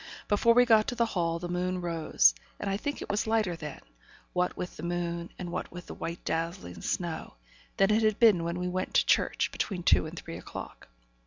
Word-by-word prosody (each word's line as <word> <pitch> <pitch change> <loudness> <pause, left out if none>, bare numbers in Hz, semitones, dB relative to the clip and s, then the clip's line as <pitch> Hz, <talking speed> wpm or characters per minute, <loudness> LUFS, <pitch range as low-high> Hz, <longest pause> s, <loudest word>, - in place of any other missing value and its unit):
Before 230 +3 +4
we 245 0 +7
got 220 -3 +5
to 245 - -2
the 235 -1 +2
hall, 170 -6 -1
the 175 +1 -5
moon 180 +1 -1
rose, 165 - +3 0.3
and - - -4
I - - +1
think 285 +8 -3
it - - -10
was 210 +2 0
lighter 220 -6 +1
then 150 -3 -7 0.5
what 180 0 0
with 180 - -5
the - - -9
moon, 170 0 -2
and 175 -2 -5
what 180 - -4
with 175 +1 -8
the - - -8
white 170 +1 -6
dazzling 165 - -3
snow 170 -3 -3 0.4
than 195 +1 +4
it 215 +1 +4
had 215 -2 +2
been 210 -8 +5
when 170 +1 -2
we 180 0 -2
went 185 +1 -3
to - - +5
church, - - +2
between 180 -4 -3
two 160 - +4
and 165 +2 -9
three 85 - -7
o'clock. - - -9
180 Hz, 220 wpm, -29 LUFS, 170-205 Hz, 0.5 s, we